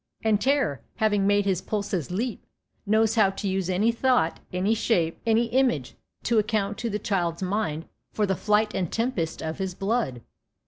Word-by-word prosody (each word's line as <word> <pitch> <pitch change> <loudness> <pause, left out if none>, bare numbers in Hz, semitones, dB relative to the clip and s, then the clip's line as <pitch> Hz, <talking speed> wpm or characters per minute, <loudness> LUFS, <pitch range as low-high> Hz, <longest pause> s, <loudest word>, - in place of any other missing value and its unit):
And 215 -2 +2
terror, 265 - +1
having 205 -2 +2
made 205 0 +3
his 190 -2 +1
pulses 200 -8 -2
leap, 220 +6 -3 0.4
knows 220 +1 +3
how 215 -4 +4
to 195 +1 -4
use 190 -1 -1
any 200 +5 +2
thought, 235 -8 +1
any 185 +4 +1
shape, 175 -7 0
any 225 +1 +4
image, 235 - +1 0.3
to 230 -2 +3
account 210 -1 -1
to 235 - -2
the 210 - -1
child's 180 -4 -1
mind 185 -5 -1 0.3
for 210 - 0
the 190 - +1
flight 210 +1 +1
and 180 -4 -2
tempest 225 -9 -2
of 160 +3 -4
his 190 -2 -3
blood. 195 - -1
205 Hz, 175 wpm, -26 LUFS, 185-225 Hz, 0.4 s, how